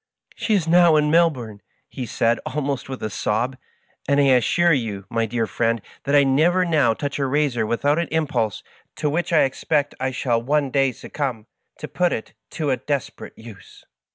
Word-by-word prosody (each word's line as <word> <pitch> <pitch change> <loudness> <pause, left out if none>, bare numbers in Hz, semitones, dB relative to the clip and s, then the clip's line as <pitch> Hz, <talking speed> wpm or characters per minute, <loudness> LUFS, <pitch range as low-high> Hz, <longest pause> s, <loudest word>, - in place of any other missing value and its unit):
' - - -67
She 220 - 0
is 175 -5 0
now 170 -1 +5
in 150 0 +2
Melbourne,^ 135 -11 +1 0.3
he 125 -3 -6
said, 115 +2 +1
almost 140 -1 -3
with 130 - -6
a 110 - -2
sob, 120 +7 -1
^ - - -26 0.5
and 140 0 +3
I 140 -1 +4
assure 165 +7 +3
you, 110 -8 -3
my 115 -1 0
dear 115 0 -1
friend, 115 +1 0 0.3
that 140 - +1
I 145 - +6
never 165 +7 +3
now 145 -9 +2
touch 145 +2 -4
a 135 - 0
razor 130 -5 0
without 145 +7 +1
an 170 - -1
impulse, 145 -9 -1 0.3
to 150 - -1
which 175 +4 -2
I 165 - +5
expect 145 +2 -1
I 130 0 0
shall 120 -3 -1
one 140 +2 0
day 135 -1 +2
succumb, 125 -2 -5 0.3
to - - -7
put 180 -1 0
it 110 - -6 0.2
to 150 -4 0
a 130 - +1
desperate 140 +1 -4
use.' 110 -3 -14
135 Hz, 195 wpm, -22 LUFS, 120-150 Hz, 0.5 s, I